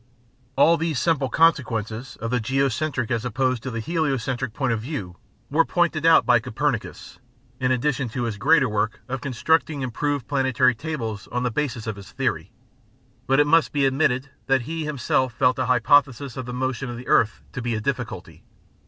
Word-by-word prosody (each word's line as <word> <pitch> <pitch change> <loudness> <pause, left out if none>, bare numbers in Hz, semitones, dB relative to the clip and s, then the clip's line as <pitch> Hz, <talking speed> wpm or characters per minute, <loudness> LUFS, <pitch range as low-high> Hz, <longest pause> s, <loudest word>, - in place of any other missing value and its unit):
All 165 +5 +5
these 165 -3 -1
simple 145 -3 +1
consequences 120 -6 +1
of 115 +1 -4
the 125 - +1
geocentric 130 +1 -1
as 115 -2 0
opposed 130 0 0
to 130 - -5
the 115 -2 -4
heliocentric 130 -4 -1
point 125 +1 -1
of 110 - -2
view 110 - -5 0.4
were 160 +3 +4
pointed 165 -3 +1
out 165 - +6
by 120 -1 +5
Copernicus, 115 +1 -3 0.4
in 130 0 +1
addition 130 0 0
to 120 +2 -3
his 115 -3 -3
greater 140 +4 +4
work 105 0 -2
of 135 0 -4
constructing 145 +2 0
improved 140 +2 -2
planetary 130 -3 +2
tables 115 -5 -5
on 125 +1 -2
the 125 - 0
basis 130 -3 -2
of 110 -2 -4
his 100 -3 -12
theory. - - -2 0.8
But 135 +2 +3
it 145 - +5
must 165 +2 +3
be 140 -2 +1
admitted 135 -1 +1 0.2
that 135 -1 +3
he 160 +3 -4
himself 130 -3 0
felt 125 +2 +2
the 130 -1 -2
hypothesis 130 +1 +3
of 130 -2 -6
the - - -4
motion 130 0 -3
of 120 - -6
the 125 - -9
earth 110 - +2
to 125 - -4
be 120 -1 -1
a - - -2
difficulty. 120 -5 -4
130 Hz, 185 wpm, -23 LUFS, 120-145 Hz, 0.8 s, out